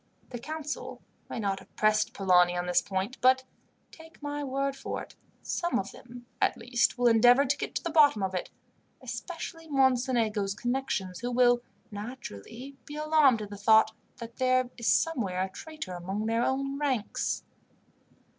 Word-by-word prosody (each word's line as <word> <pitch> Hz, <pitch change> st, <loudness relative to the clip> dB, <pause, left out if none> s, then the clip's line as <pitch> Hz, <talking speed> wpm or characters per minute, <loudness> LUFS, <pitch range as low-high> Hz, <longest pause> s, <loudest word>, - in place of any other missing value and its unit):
The 245 Hz, -, -5 dB
council 305 Hz, +3 st, -6 dB, 0.3 s
may -, -, -4 dB
not 195 Hz, -2 st, -1 dB
have -, -, -19 dB
pressed 215 Hz, 0 st, +2 dB
Polani 180 Hz, -2 st, +3 dB
on 175 Hz, -, -1 dB
this 180 Hz, 0 st, +3 dB
point, 195 Hz, +6 st, -3 dB
but, 260 Hz, +1 st, +5 dB, 0.5 s
take 325 Hz, 0 st, -15 dB
my 290 Hz, 0 st, -4 dB
word 275 Hz, 0 st, -1 dB
for 270 Hz, -, -5 dB
it, -, -, -15 dB, 0.3 s
some 345 Hz, 0 st, -1 dB
of 195 Hz, -, -3 dB
them, 245 Hz, 0 st, -12 dB, 0.2 s
at -, -, +2 dB
least, 240 Hz, +1 st, +1 dB
will 245 Hz, -, 0 dB
endeavour 245 Hz, +4 st, +6 dB
to 275 Hz, -, +1 dB
get -, -, -5 dB
to -, -, -2 dB
the 340 Hz, -, -2 dB
bottom 290 Hz, -10 st, +5 dB
of 190 Hz, 0 st, -1 dB
it, 180 Hz, -, -3 dB, 0.5 s
especially 330 Hz, -2 st, -6 dB
Mocenigo's 245 Hz, -7 st, +1 dB
connections, 240 Hz, -7 st, -2 dB
who 245 Hz, -, -3 dB
will 245 Hz, 0 st, +4 dB, 0.3 s
naturally 230 Hz, -, -8 dB
be 295 Hz, -, -8 dB
alarmed 300 Hz, -7 st, +3 dB
at 205 Hz, -, -9 dB
the 205 Hz, -, -7 dB
thought 220 Hz, +2 st, +5 dB, 0.3 s
that 230 Hz, -1 st, -9 dB
there 255 Hz, -1 st, +2 dB
is 235 Hz, -2 st, -4 dB
somewhere 205 Hz, -, +1 dB
a 190 Hz, -, -3 dB
traitor 310 Hz, -, -7 dB
among 190 Hz, +4 st, -4 dB
their 230 Hz, +1 st, +1 dB
own 275 Hz, +2 st, -1 dB
ranks. 260 Hz, -7 st, -1 dB
245 Hz, 165 wpm, -29 LUFS, 205-275 Hz, 0.5 s, endeavour